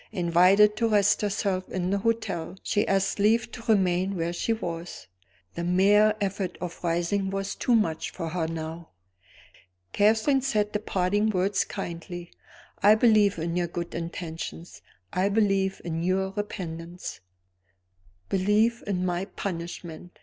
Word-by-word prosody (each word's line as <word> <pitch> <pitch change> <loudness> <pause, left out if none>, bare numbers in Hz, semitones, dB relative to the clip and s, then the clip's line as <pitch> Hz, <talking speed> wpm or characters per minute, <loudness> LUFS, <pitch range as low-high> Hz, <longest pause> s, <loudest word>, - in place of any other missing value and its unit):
Invited 185 +3 +4
to 230 - +2
rest 205 -1 +3
herself 195 -2 -1
in 185 0 -2
the 200 - +1
hotel, 215 -5 -2
she 205 - 0
asked 195 +1 +1
leave 220 +3 +3
to 240 - -8
remain 190 -1 +2
where 170 0 -2
she 200 - -1
was; 170 -6 -4 0.5
the 170 - -4
mere 205 +4 +4
effort 195 -2 -2
of 180 0 -7
rising 175 +3 0
was 195 0 -3
too 245 - +1
much 165 -8 0
for 165 -3 -5
her 165 -1 -1
now. 165 0 -6 1.0
Catherine 220 +7 +3
said 215 -6 0
the 210 - 0
parting 205 +1 0
words 195 0 +1
kindly. 175 +1 -7 0.5
"I 210 +2 +7
believe 215 -4 +4
in 170 +1 -2
your 175 -1 0
good 170 0 -5
intentions; 170 0 -6 0.3
I 190 +2 +2
believe 195 -2 +1
in 165 -1 -2
your 190 +2 0
repentance." 175 -4 -6 1.1
"Believe 210 +5 +2
in 185 -2 -1
my 180 +1 -1
punishment!" 175 -2 -6
190 Hz, 140 wpm, -26 LUFS, 175-205 Hz, 1.1 s, I